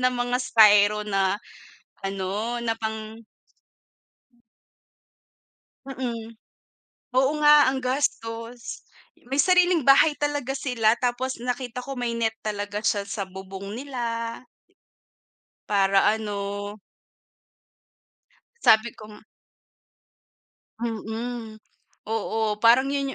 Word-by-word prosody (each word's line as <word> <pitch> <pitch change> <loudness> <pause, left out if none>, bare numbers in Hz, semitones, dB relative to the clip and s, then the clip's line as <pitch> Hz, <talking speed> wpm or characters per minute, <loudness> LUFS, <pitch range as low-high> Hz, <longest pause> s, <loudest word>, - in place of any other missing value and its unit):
ng 255 0 +2
mga 245 0 0
styro 210 -3 +5
na, 195 -1 +1 0.7
ano 195 +5 -3
na 225 -1 0
pang 220 0 -6 2.6
Mm. 235 -3 -5 0.8
Oo 265 +2 +4
nga 295 -2 +7
ang 265 - -2
gastos, 235 -3 -3 0.5
may 275 - 0
sariling 360 -4 +3
bahay 275 +3 +7
talaga 290 -3 -1
sila 245 -5 +1
tapos 250 +1 -2
nakita 250 0 -3
ko 275 +2 -7
may 245 -1 -1
net 225 -1 -1
talaga 205 0 -4
siya 205 -3 0
sa 200 0 -3
bubong 190 +1 -9
nila. 235 -3 -4 1.3
Para 195 -1 +3
ano 205 -1 -4 1.8
Sabi 220 +1 +5
kong 215 0 -13 1.5
Mm, 225 0 -5 0.5
oo, 220 0 -1
parang 240 +3 +6
yun 275 -1 -2
230 Hz, 90 wpm, -25 LUFS, 210-255 Hz, 2.6 s, nga